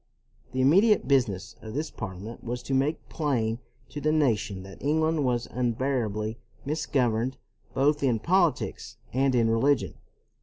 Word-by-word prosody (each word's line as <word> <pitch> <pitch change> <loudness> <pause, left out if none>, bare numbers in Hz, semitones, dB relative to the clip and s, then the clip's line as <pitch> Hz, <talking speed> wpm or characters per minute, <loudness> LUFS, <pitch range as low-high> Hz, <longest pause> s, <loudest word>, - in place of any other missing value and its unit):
The 130 +1 -1
immediate 195 - +5
business 110 -10 +1
of 110 +1 -8
this 150 +1 -2
Parliament 105 +2 -7
was 120 +1 -4
to 135 - -3
make 140 +4 0
plain 120 -7 -1 0.3
to 145 - -6
the 155 - +2
nation 115 -10 +1
that 95 0 -12
England 155 +1 +1
was 125 -2 0
unbearably 115 -3 -1 0.3
misgoverned 130 -5 0 0.4
both 145 +2 +2
in 125 -5 +2
politics 170 - 0 0.2
and 135 0 +2
in 115 -2 +3
religion. 115 +4 +2
130 Hz, 140 wpm, -27 LUFS, 115-145 Hz, 0.4 s, immediate